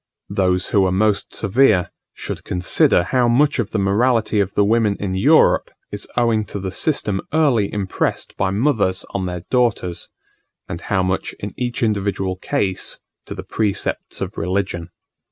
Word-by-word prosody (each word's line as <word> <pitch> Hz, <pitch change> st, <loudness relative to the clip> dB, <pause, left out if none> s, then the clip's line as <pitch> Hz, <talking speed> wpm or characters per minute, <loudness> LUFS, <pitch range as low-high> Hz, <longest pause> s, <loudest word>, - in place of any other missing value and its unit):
Those 90 Hz, -1 st, +1 dB
who 100 Hz, -, +3 dB
are -, -, 0 dB
most 105 Hz, +2 st, +1 dB
severe, 110 Hz, -3 st, +3 dB, 0.2 s
should -, -, -6 dB
consider 90 Hz, -1 st, +2 dB
how 125 Hz, +6 st, +1 dB
much 135 Hz, +4 st, +3 dB
of 115 Hz, -, -1 dB
the -, -, -2 dB
morality 110 Hz, +2 st, +2 dB
of 100 Hz, -1 st, -1 dB
the 100 Hz, -, +4 dB
women 110 Hz, -1 st, +2 dB
in 95 Hz, -2 st, -2 dB
Europe 95 Hz, -, +4 dB, 0.2 s
is -, -, -5 dB
owing 115 Hz, -3 st, +2 dB
to 100 Hz, -, -6 dB
the 95 Hz, -1 st, -4 dB
system 105 Hz, -, 0 dB
early 135 Hz, -10 st, +2 dB
impressed 100 Hz, -3 st, -2 dB
by 95 Hz, -, 0 dB
mothers 100 Hz, -3 st, +1 dB
on 95 Hz, -2 st, -2 dB
their 90 Hz, -1 st, -4 dB
daughters, 115 Hz, -9 st, 0 dB, 0.6 s
and 85 Hz, -, -6 dB
how 95 Hz, -3 st, 0 dB
much 95 Hz, +1 st, -2 dB
in 100 Hz, -2 st, -6 dB
each 120 Hz, -1 st, -3 dB
individual 100 Hz, -3 st, 0 dB
case 95 Hz, -2 st, -2 dB, 0.3 s
to -, -, -6 dB
the -, -, -7 dB
precepts 105 Hz, -3 st, -2 dB
of -, -, -4 dB
religion. 90 Hz, -2 st, -2 dB
100 Hz, 160 wpm, -20 LUFS, 95-115 Hz, 0.6 s, the